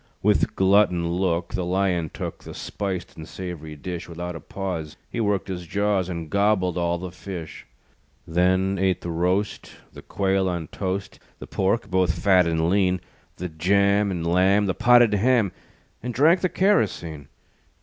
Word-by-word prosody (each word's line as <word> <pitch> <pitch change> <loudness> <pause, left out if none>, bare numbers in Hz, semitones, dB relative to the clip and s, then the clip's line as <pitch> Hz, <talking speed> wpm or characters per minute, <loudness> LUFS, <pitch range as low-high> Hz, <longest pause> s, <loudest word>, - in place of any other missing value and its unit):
With - - +2
glutton 95 -3 +3
look 85 -1 -1
The 95 - -1
Lion 90 -2 0
took - - -6
The - - -9
spiced 95 -3 -4
and 80 0 -9
sav'ry 85 -5 -7
dish. 85 +3 -6
Without 85 +1 -5
a - - -6
pause 85 -6 -5
He - - -3
worked 105 -3 0
his 90 -3 -5
jaws, 100 -1 0
And 85 -2 -4
gobbled 100 -1 +1
all 85 -1 0
the 90 0 -6
fish. 90 -3 -8 0.6
Then 95 +3 +2
ate 95 -2 +1
the 85 - -4
roast, 90 +5 -1 0.2
The - - -10
quail 95 -1 0
on 85 -4 -4
toast, 95 0 -4 0.2
The - - -9
pork, 100 +4 -1
both 90 -2 +2
fat 90 0 +4
and 80 0 +1
lean; 95 0 +2 0.4
The 90 - -4
jam 100 +5 +2
and 85 -3 -3
lamb, 95 +4 +3
The 95 - 0
potted 120 0 +5
ham, 110 -1 +3 0.5
And 125 0 -5
drank 160 +7 +5
the 185 - +1
kerosene. 90 - 0
95 Hz, 160 wpm, -24 LUFS, 85-100 Hz, 0.6 s, potted